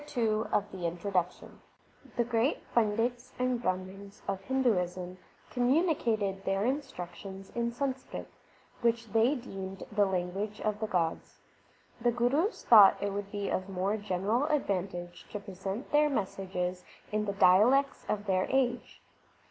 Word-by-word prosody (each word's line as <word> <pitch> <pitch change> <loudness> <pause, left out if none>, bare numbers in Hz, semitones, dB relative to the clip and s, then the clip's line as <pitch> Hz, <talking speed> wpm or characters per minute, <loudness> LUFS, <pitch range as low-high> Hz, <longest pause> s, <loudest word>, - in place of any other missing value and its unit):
THE 295 - -13
SIKH 285 - -11 0.6
RELIGION 175 -2 -3
CHAPTER 180 -2 -1
II - - -14 0.7
The 240 - +4
great 235 +4 -1
Pandits 235 +3 +1
and 250 -1 0
Brahmans 190 0 -4
of 195 -1 -2
Hinduism 185 -7 0 0.3
communi 300 +8 +3
cated 205 -6 -1
their 195 +1 0
instructions 195 -7 -5
in 235 0 -1
Sanskrit, 260 +1 -4 0.5
which 235 -1 +1
they 225 +6 +4
deemed 195 -6 -7
the 205 -1 +3
language 190 +3 -2
of 215 -1 -1
the 220 - -2
gods. 170 -5 -1 0.7
The 240 - +4
Gurus 265 - +1
thought 210 -4 +8
it 200 -1 -2
would 200 0 -4
be 205 -1 -3
of 185 +1 -2
more 195 +2 0
general 205 +5 0
advantage 190 -11 -2
to 210 - -2
present 195 +4 -6
their 295 0 +4
messages 185 -6 -2 0.3
in 210 0 0
the 200 - -2
dialects 220 +9 +4
of 205 0 -1
their 185 -2 +1
age. 255 -2 0
205 Hz, 140 wpm, -30 LUFS, 190-245 Hz, 0.7 s, thought